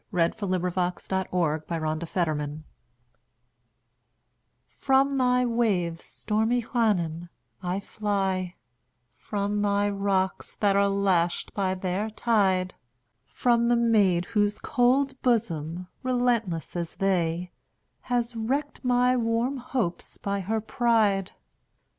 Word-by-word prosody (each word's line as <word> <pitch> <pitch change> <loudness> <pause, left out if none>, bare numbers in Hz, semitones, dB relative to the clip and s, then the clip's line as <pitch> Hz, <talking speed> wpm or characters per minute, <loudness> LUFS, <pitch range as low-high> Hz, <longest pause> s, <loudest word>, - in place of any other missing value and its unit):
Wales: 170 -4 +2
Llannon 180 -2 -1
Song 180 -5 -1
By 170 - -2
Anna 155 +1 -2
Seward 180 +2 0 0.2
(1747–1809) 150 +1 -5 2.2
FROM 275 +1 +3
thy 250 0 +3
waves, 200 -9 0
stormy 220 +3 0
Llannon, 175 -9 0 0.3
I 180 +1 -2
fly; 195 -4 -2 0.6
From 205 0 -2
thy 205 0 +2
rocks, 195 -2 -1
that 200 -2 +2
are 200 0 +4
lashed 190 -4 +1
by 190 -2 0
their 190 +3 -2
tide; 195 -5 +1 0.5
From 235 -1 +2
the 240 - +4
maid 205 -7 +3
whose 210 0 +1
cold 265 +1 +1
bosom, 180 - 0 0.2
relentless 240 -11 0
as 170 -1 -4
they, 180 -2 0 0.6
Has 240 -1 0
wrecked 275 +7 -2
my 250 0 +3
warm 235 +3 0
hopes 240 -8 -3
by 200 0 -2
her 215 +4 -1
pride! 215 -4 +1
200 Hz, 110 wpm, -26 LUFS, 180-235 Hz, 2.2 s, are